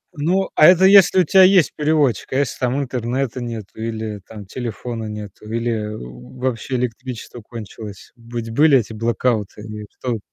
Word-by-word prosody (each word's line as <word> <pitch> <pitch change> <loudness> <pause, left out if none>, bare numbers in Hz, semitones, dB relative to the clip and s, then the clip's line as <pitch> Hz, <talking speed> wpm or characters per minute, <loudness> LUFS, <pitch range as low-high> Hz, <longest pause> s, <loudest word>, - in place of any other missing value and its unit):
Ну, 180 +6 0
а 155 - +7
это 185 +1 +6
если 190 -1 +7
у - - +4
тя 190 +2 +5
есть 185 -3 +5
переводчик. 150 -4 +1
А - - -1
если, 140 -2 -1
там, 125 +2 0
интернета 125 0 -2
нету 110 -3 -7
или, 110 -3 -4
там, 105 -3 -10
телефона 115 +1 -5
нету, 105 0 -8
или 115 -2 -1 0.5
вообще 130 0 -2
электричество 125 -1 -5
кончилось. 105 -2 -10
Ведь 115 -1 -7
были 145 +3 +5
эти 110 -2 -2
блэкауты 115 -2 -1
и 105 -1 -7
в - - -27
То 120 -3 -2
120 Hz, 165 wpm, -20 LUFS, 110-135 Hz, 0.5 s, а